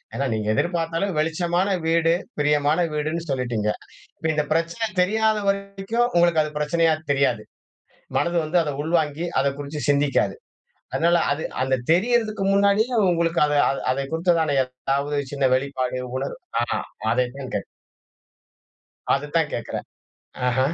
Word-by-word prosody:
ஏனா, 140 - -1
நீங்க 110 -1 -2
எதிர்பார்த்தாலும் 170 - -1
வெளிச்சமான 175 +4 +1 0.2
வீடு, 165 0 +3 0.3
பிரியமான 150 0 +2 0.2
வீடுன்னு 155 +2 -2
சொல்லிட்டீங்க. 120 -5 -1 0.5
இப்போ 160 - -3
இந்த 150 -1 +1
பிரச்சனை 170 +7 0 0.2
தெரியாத 220 +3 +2
வரைக்கும் 200 +4 -1
உங்களுக்கு 170 -2 +4
அது 150 - -5
பிரச்சனையா 160 +2 +2 0.2
தெரியாது. 130 -6 +1 0.8
மனது 170 0 0
வந்து 160 +3 +1
அத 150 - -2
உள்வாங்கி 160 0 0 0.2
அத 135 - 0
குறிச்சு 145 +1 -5
சிந்திக்காது. 140 -8 +2 0.6
அதனால 170 +1 +3
அது 150 +2 -1 0.2
அந்த 130 0 +2 0.2
தெரியறதுக்கு 215 +2 +2
முன்னாடியே 200 +5 +3 0.2
உங்களுக்கு 170 0 +1
அத 150 - -1 0.4
அத 130 - -2 0.2
குறித்ததான 165 -3 +2
ஏதாவது 135 +3 -2 0.2
சின்ன 140 -2 +2
வெளிப்பாடு, 130 -2 -2 0.2
உணர்வு. 135 - -4 0.2
ஆ. - - +2 0.5
அதைத்தான் 125 +2 -2
கேட்கறன். - - -2 1.5
அதத்தான் 150 +3 0
கேக்கிறேன். 115 - -4 0.6
ஆஹ. 125 +1 +1
160 Hz, 125 wpm, -23 LUFS, 140-175 Hz, 1.5 s, உங்களுக்கு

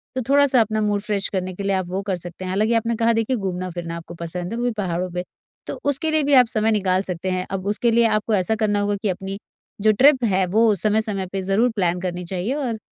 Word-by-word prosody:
तो 260 - -1
थोड़ा 285 +1 +5
सा 255 -3 +4
अपना 215 -1 0
मूड 205 -1 0
फ्रेश 205 -2 -2
करने 185 -1 -3
के 200 - -5
लिए 195 0 +1
आप 185 -2 -2
वो 190 +2 -2
कर 195 -1 -1
सकते 175 +1 -8
हैं - - -4
हालाँकि 215 +4 +1
आपने 230 0 0
कहा 230 0 +3
देखिए 225 +3 0
घूमना-फिरना 180 -3 -4
आपको 170 0 -10
पसंद 175 +2 -5
है, 230 - -3
वो - - -2
भी 245 - +1
पहाड़ों 180 -2 -2
पे, 180 0 -3 0.4
तो - - -5
उसके 285 +3 0
लिए 310 -1 +2
भी 285 0 +1
आप 250 -2 +8
समय 220 -1 +1
निकाल 185 -3 +1
सकते 180 -1 -4
हैं। 185 0 -1
अब 195 -1 -3
उसके 220 +3 +1
लिए 235 +1 +4
आपको 215 0 0
ऐसा 195 +4 +1
करना 210 -2 +1
होगा 205 0 0
कि 210 - +1
अपनी 195 +2 -4 0.4
जो 215 - +5
ट्रिप 260 +3 +5
है, 190 -4 +2
वो 220 +3 +3
समय-समय 210 0 0
पर 195 - -1
ज़रूर 195 +6 +2
प्लान 180 -3 0
करनी 180 -1 -4
चाहिए 185 +7 -2
और 255 -6 -3
205 Hz, 255 wpm, -22 LUFS, 185-225 Hz, 0.4 s, आप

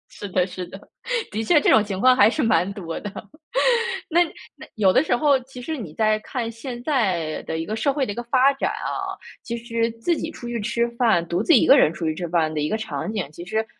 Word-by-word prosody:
是 205 - -7
的 180 -1 +2
是 185 0 -6
的， 190 - -10 0.5
的 220 +2 -2
确 300 +7 +4
这 - - +3
种 220 - +6
情 195 -2 -4
况 255 +2 +6
还 220 -3 +6
是 295 +3 -1
蛮 185 -4 +2
多 170 -5 -6
的。 205 - -6 1.0
那 345 +1 +4 0.3
那 - - -12
有 200 -4 +4
的 260 - +4
时 - - 0
候， 280 +2 +4
其 255 0 -11
实 315 +5 -4
你 200 - -7
再 215 -1 +2
看 230 +1 -4
现 240 +1 -7
在 190 - 0
的 160 - -4
一 165 - -3
个 215 - -3
社 225 +6 +1
会 275 -2 0
的 205 - -4
一 - - -13
个 240 - -4
发 260 +3 +3
展 270 - -1
啊， - - -4 0.2
其 235 0 -4
实 230 0 -1
自 340 +9 +1
己 320 - -4
出 240 - -9
去 240 0 -3
吃 235 +2 0
饭， 215 -9 +2
独 175 +5 -1
自 335 - +4
一 245 - +6
个 275 - +8
人 155 - +5
出 165 - -5
去 155 - -1
吃 175 - -4
饭 165 -2 +1
的 150 - -2
一 150 - -1
个 220 - 0
场 220 -1 -4
景， 210 -9 -3
其 175 - -9
实 220 +4 -1
225 Hz, 275 characters per minute, -23 LUFS, 185-250 Hz, 1.0 s, 个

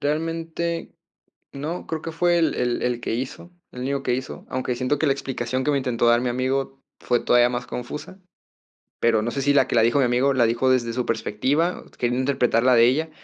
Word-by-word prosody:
Realmente, 165 +2 -2 0.6
no, 155 +6 -5
creo 160 -1 -3
que 165 - -5
fue 175 +1 +2
el 165 - +1
el 120 -1 -1
el 125 -1 -1
que - - -2
hizo, 130 +8 -5 0.2
el 125 - -8
único 140 +1 -2
que 125 - 0
hizo, 130 +1 -5
aunque 130 -1 -2
siento 130 +4 0
que 160 - +2
la 135 - +4
explicación 130 -2 -3
que 150 - +1
me 140 - +2
intentó 125 -3 0
dar 120 +1 +4
mi 125 - -1
amigo 135 +2 -2 0.2
fue 120 -1 +1
todavía 120 0 +4
más 120 0 -4
confusa, 150 +9 -7 0.8
pero 115 -2 +3
no 120 - -1
sé 135 - -3
si 145 +1 +2
la 135 -2 +4
que - - -2
la 115 - +5
dijo 120 +5 +3
mi 135 - +4
amigo 125 +3 +2
la 125 - +3
dijo 120 +3 +1
desde 120 -3 +1
su 125 +1 -2
perspectiva, 135 +10 0
queriendo 120 +1 0
interpretar 125 -3 +1
la 130 0 +5
de 115 -1 +6
ella, 155 +6 +1
130 Hz, 220 wpm, -23 LUFS, 120-145 Hz, 0.8 s, de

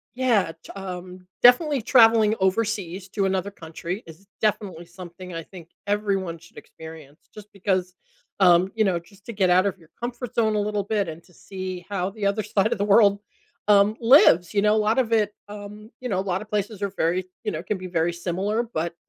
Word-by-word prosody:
yeah, 240 -9 +2
t - - -11
um, 180 -1 -8 0.2
definitely 265 +3 +5
traveling 225 -2 +5
overseas 190 -2 -1
to 200 0 -1
another 190 +1 -1
country 170 +3 -7
is 165 +4 -14 0.2
definitely 200 -5 -1
something 180 0 -10
I 165 0 -5
think 170 -1 -13 0.2
everyone 195 -5 -1
should 165 - -19
experience 160 -2 -13
just 210 -1 -12
because, 185 -2 -1 0.5
um, 180 0 +5
you 220 - +2
know, 185 -3 +1
just 195 +3 -21
to 235 - -5
get 190 -3 +1
out 185 +2 +4
of 195 - -3
your 165 -2 -21
comfort 240 0 -5
zone 220 -2 +2
a - - +1
little 205 0 -1
bit 205 -1 -1
and 160 +1 -9
to 180 - -24
see 185 -1 -7
how 190 -2 -2
the 205 0 -5
other 200 +2 +1
side 210 +1 0
of 235 - 0
the - - +1
world, 200 -1 +5 0.5
um, 205 +1 +5
lives, 225 - +6
you 200 - +3
know, 210 0 +4
lot 215 +2 +1
of 230 -3 0
it, 210 -2 +2 0.2
um, 210 +1 -10
you 250 - -4
know, 190 - 0
a - - +1
lotta 185 +4 -2
places 210 -1 -3
are 200 - -1
very 175 +3 0 0.2
you 215 - -2
know, 155 - -4
can 200 +3 -2
be 185 0 -7
very 170 -1 0
similar, 190 +6 -2
but, 170 -7 -4
195 Hz, 205 wpm, -24 LUFS, 180-215 Hz, 0.5 s, lives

